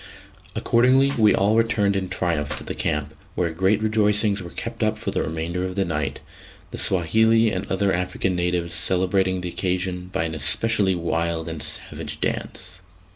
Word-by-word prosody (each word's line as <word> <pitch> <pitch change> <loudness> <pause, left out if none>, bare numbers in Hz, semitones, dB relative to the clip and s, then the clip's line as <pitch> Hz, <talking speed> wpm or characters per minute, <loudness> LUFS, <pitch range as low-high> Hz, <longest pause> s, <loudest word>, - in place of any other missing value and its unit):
Accordingly 130 +4 +3
we 110 -2 +5
all 100 +3 +3
returned 115 -3 +2
in 95 -1 -2
triumph 85 -5 -1
to - - -7
the - - -4
camp, 75 0 -2 0.2
where 85 -2 0
great 95 +5 +2
rejoicings 105 -1 +2
were 90 - -7
kept - - -6
up - - +1
for - - -3
the - - 0
remainder 85 +3 -3
of 95 0 -4
the 100 -1 +1
night, 75 -5 -2 0.5
the - - -5
Swahili 110 +5 +3
and 95 0 -3
other 95 0 +2
African 90 +1 -1
natives 90 -1 -1
celebrating 95 +1 +1
the 90 - -3
occasion 90 0 -2
by - - 0
an 80 -1 -3
especially 95 - +1
wild 85 -1 -1
and 80 -2 -5
savage - - -2
dance. 90 0 -3
90 Hz, 170 wpm, -23 LUFS, 85-105 Hz, 0.5 s, we